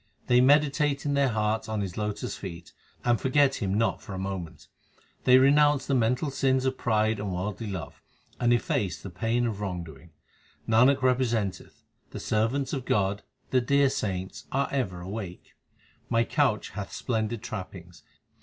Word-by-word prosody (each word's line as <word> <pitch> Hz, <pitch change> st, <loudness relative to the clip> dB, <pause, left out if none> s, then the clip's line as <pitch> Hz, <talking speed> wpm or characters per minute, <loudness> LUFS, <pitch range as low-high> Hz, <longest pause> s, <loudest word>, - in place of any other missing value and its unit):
They 125 Hz, 0 st, +5 dB
meditate 145 Hz, +1 st, +3 dB
in 145 Hz, -, 0 dB
their 140 Hz, -1 st, +3 dB
hearts 110 Hz, -1 st, -1 dB
on 110 Hz, -1 st, -1 dB
His 95 Hz, -3 st, -4 dB
lotus 105 Hz, -1 st, -3 dB
feet, 85 Hz, -3 st, -9 dB, 0.3 s
and 120 Hz, -1 st, +2 dB
forget 135 Hz, +1 st, +3 dB
Him 95 Hz, -1 st, 0 dB
not 115 Hz, +2 st, +1 dB
for 100 Hz, -, -8 dB
a -, -, -5 dB
moment. 95 Hz, -3 st, -5 dB, 0.6 s
They 125 Hz, 0 st, +7 dB
renounce 145 Hz, +1 st, +4 dB
the 140 Hz, -, -1 dB
mental 125 Hz, +4 st, +1 dB
sins 130 Hz, -1 st, +1 dB
of 130 Hz, 0 st, +1 dB
pride 110 Hz, -3 st, +1 dB
and 100 Hz, -1 st, -3 dB
worldly 95 Hz, +4 st, -4 dB
love, 95 Hz, -6 st, -6 dB, 0.4 s
and 120 Hz, 0 st, +2 dB
efface 100 Hz, -6 st, 0 dB
the 95 Hz, -, -8 dB
pain 115 Hz, +7 st, 0 dB
of 105 Hz, -3 st, -3 dB
wrong 90 Hz, -4 st, -3 dB
doing. 80 Hz, +1 st, -13 dB, 0.6 s
Nanak 125 Hz, +4 st, +4 dB
representeth, 120 Hz, -7 st, 0 dB, 0.3 s
the -, -, -7 dB
servants 115 Hz, +6 st, 0 dB
of 130 Hz, -3 st, -3 dB
God, 100 Hz, -1 st, +1 dB, 0.3 s
the 130 Hz, -, +3 dB
dear 140 Hz, +2 st, +3 dB
saints 95 Hz, -5 st, -4 dB
are 140 Hz, +1 st, 0 dB
ever 95 Hz, -11 st, -2 dB
awake. 95 Hz, -1 st, -7 dB, 0.6 s
My 115 Hz, 0 st, +3 dB
couch 130 Hz, -4 st, 0 dB
hath 100 Hz, 0 st, -6 dB
splendid 115 Hz, -2 st, -2 dB
trappings. 90 Hz, -6 st, -8 dB
110 Hz, 165 wpm, -27 LUFS, 95-130 Hz, 0.6 s, They